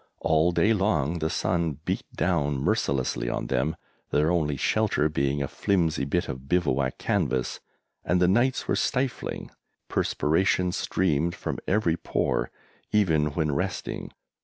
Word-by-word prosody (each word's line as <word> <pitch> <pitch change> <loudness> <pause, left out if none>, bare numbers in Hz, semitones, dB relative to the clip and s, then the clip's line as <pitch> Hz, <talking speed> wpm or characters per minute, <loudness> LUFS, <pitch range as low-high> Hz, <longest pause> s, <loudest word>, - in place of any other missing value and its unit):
All 80 +2 +3
day 105 +5 +3
long 85 -6 +1
the 80 0 0
sun 85 -5 0
beat - - -3
down 75 -6 +1
mercilessly 65 -2 0
on - - -2
them, 65 +5 0 0.3
their 75 +3 +2
only 75 -5 +1
shelter 100 -4 +1
being 70 -1 0
a - - -2
flimsy 85 -6 0
bit 85 +5 0
of 65 +1 -7
bivouac 70 -7 +1
canvas, 65 0 -1 0.4
and 90 +2 +1
the 90 - +4
nights 120 +7 +2
were - - +2
stifling. 130 -1 -2 0.4
Perspiration 90 +3 +1
streamed 85 -2 0
from - - -4
every 90 -5 +2
pore, - - -1 0.4
even 80 -8 +3
when 75 -3 0
resting. 90 +4 -3
80 Hz, 135 wpm, -26 LUFS, 70-90 Hz, 0.4 s, the